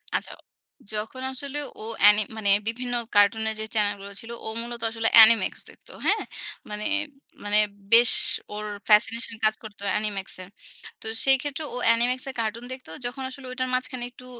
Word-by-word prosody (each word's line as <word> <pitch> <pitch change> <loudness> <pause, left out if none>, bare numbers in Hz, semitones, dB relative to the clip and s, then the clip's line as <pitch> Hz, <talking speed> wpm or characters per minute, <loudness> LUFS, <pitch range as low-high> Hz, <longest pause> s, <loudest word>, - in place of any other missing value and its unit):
আচ্ছা। - - -3 0.6
যখন 220 +5 -5
আসলে 280 +2 -6 0.2
ও - - -8 0.2
এ্যানি 210 +1 +7 0.2
মানে 200 -2 -1 0.2
বিভিন্ন 245 +1 -2 0.2
কার্টুনের 220 +2 +3
যে 220 - -3
চ্যানেল 205 -1 +2
গুলো 200 - -9
ছিল 230 +1 -10
ও - - -3
মূলত 235 0 -6
আসলে 225 0 0
অ্যানিমেক্স 225 -2 +7
দেখত। - - -19 0.2
হ্যাঁ? - - +2 0.5
মানে, 210 0 -5 0.6
মানে, 205 +1 +3 0.3
বেশ 235 0 +7 0.4
ওর 210 0 -5 0.2
ফ্যাসিনেশন 225 +2 +3
কাজ 215 0 +4
করতো 210 -2 -11 0.2
এনিমেক্স 205 -3 -4
এ। - - -10 0.6
তো - - -11 0.2
সেই 270 -1 +5
ক্ষেত্রে 290 +1 -4
ও - - -3
অ্যানিমেক্স 240 +2 +2
এ - - -3
কার্টুন 230 +2 -3
দেখত। 260 -7 -12 0.2
যখন 260 +2 -5
আসলে 265 0 -11
ওটার 255 0 -3
মাঝখানে 255 -1 -2
একটু 250 +1 -15
230 Hz, 165 wpm, -25 LUFS, 210-255 Hz, 0.6 s, এ্যানি